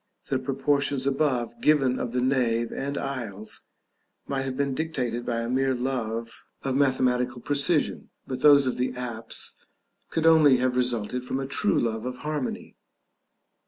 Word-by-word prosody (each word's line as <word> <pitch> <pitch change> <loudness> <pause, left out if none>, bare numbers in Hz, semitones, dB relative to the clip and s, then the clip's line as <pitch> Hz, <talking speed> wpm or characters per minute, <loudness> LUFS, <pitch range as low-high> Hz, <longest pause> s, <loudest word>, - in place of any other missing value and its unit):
The 135 - +1
proportions 135 0 0
above 130 -4 0
given 135 -4 +3
of 120 - -3
the 125 +1 0
nave 120 -3 +1
and 140 +1 -3
aisles 110 -6 -5 0.6
might 135 -1 -2
have 130 -1 -4
been 140 -1 0
dictated 125 -6 -3
by 115 -1 0
a 115 - -3
mere 130 +1 +1
love 115 -3 -3 0.2
of 135 -1 -1
mathematical 125 -2 +1
precision; 145 +4 +1 0.2
but 130 -1 -5
those 145 -2 +7
of 130 - -1
the 125 0 -1
apse 115 -3 -3 0.6
could 165 -1 -1
only 155 -5 +6
have 125 0 0
resulted 125 -1 0
from 130 +1 -3
a 135 - -3
true 135 - +1
love 110 0 -1
of 125 - -4
harmony. 150 -2 -4
130 Hz, 155 wpm, -26 LUFS, 120-140 Hz, 0.6 s, those